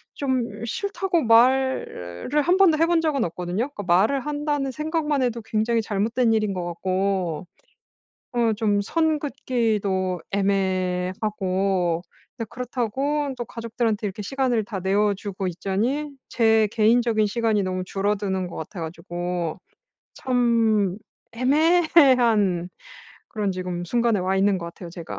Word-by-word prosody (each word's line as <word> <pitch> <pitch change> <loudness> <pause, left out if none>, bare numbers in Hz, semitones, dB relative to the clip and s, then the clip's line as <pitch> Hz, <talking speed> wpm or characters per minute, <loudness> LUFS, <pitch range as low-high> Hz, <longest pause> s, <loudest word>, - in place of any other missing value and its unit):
좀 260 -3 0 0.2
싫다고 380 - -1
말을 235 - +2
1 355 +5 +3
번도 360 -5 +5
해 330 - +5
본 340 -1 +2
적은 300 -6 0
없거든요. 180 - -3
그러니까 210 -8 -8
말을 195 +10 +3
한다는 290 -2 -1
생각만 305 -1 -1
해도 240 -2 -1
굉장히 225 +1 0
잘못된 225 +3 +1
일인 215 -3 +1
것 180 -2 -3
같고 185 -1 -2 0.9
어 235 -2 +2
좀 205 -2 +1
선 315 +6 +1
긋기도 215 - -1
애매하고 185 -1 0 0.3
이제 230 - -4
그렇다고 260 +4 -2
또 240 - -3
가족들한테 230 -2 -2
이렇게 195 +1 -5
시간을 250 -1 0
다 200 -2 -5
내어 200 +2 +2
주고 195 -1 -5
있자니 215 - -2 0.2
제 220 -2 +3
개인적인 225 0 +3
시간이 220 -1 +1
너무 185 -1 -2
줄어드는 195 -1 -1
것 - - -9
같아 165 +4 -7
가지고 175 +1 -4 0.6
참 230 -6 +2 0.4
애매한 255 - +3 0.6
그런 210 -2 -2
지금 180 -1 -4
순간에 235 +1 +1
와 190 +1 0
있는 195 0 +2
것 170 - -6
같아요, 170 +1 -9
제가. 170 -1 -7
215 Hz, 280 characters per minute, -24 LUFS, 190-255 Hz, 0.9 s, 번도